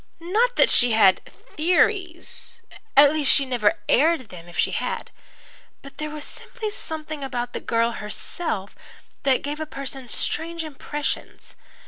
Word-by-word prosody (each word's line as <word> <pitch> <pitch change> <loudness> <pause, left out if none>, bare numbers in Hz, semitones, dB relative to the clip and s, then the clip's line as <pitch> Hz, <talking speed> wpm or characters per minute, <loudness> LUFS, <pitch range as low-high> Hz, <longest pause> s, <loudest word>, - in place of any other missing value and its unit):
Not 440 +9 +1
that - - +5
she 245 -2 +4
had 195 -4 +5
'theories' 350 +2 -1 0.3
at 285 +1 +8
least, 300 -3 +5
she 280 - +6
never 240 -5 +1
aired 300 -3 +3
them 175 -2 -11
if 175 - -11
she - - +2
had. 470 -1 -3 0.7
But 275 - -13
there 305 0 -3
was 300 -1 -6
simply 435 -3 -5
something 310 -5 -5
about 245 -2 -3
the - - -3
girl 230 0 +1
herself 210 - -4 0.5
that 265 -2 +2
gave 295 +2 -4
a 315 - -4
person 270 -2 -6
strange 330 +7 0
impressions. 295 -1 -5
295 Hz, 145 wpm, -23 LUFS, 245-330 Hz, 0.7 s, at